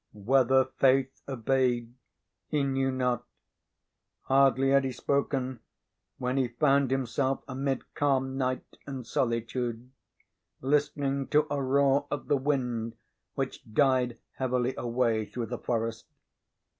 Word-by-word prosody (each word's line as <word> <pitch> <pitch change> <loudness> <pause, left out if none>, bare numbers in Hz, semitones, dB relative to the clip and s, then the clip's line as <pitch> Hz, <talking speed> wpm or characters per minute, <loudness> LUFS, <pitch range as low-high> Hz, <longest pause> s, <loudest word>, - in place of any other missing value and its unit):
Whether 130 +5 +3
Faith 130 0 +2
obeyed 125 -2 0 0.5
he 150 -2 0
knew 135 -1 +1
not. 125 -2 0 1.0
Hardly 135 0 +3
had 140 0 +5
he 135 - -1
spoken 130 -1 -1 0.6
when 125 +1 -1
he 130 -2 +2
found 135 +2 +2
himself 135 +1 0
amid 135 0 -3
calm 135 -2 +1
night 130 -1 -3
and 135 -3 -6
solitude, 120 +1 -2 0.7
listening 140 0 0
to 150 0 +3
a 140 - -1
roar 135 +1 +3
of 145 - -4
the 145 - +4
wind 125 -5 -1 0.4
which 135 -1 -3
died 130 -1 +2 0.2
heavily 125 -1 0
away 115 -2 0
through 120 -2 -4
the 120 +2 -5
forest. 115 -1 -2
130 Hz, 120 wpm, -29 LUFS, 125-135 Hz, 1.0 s, had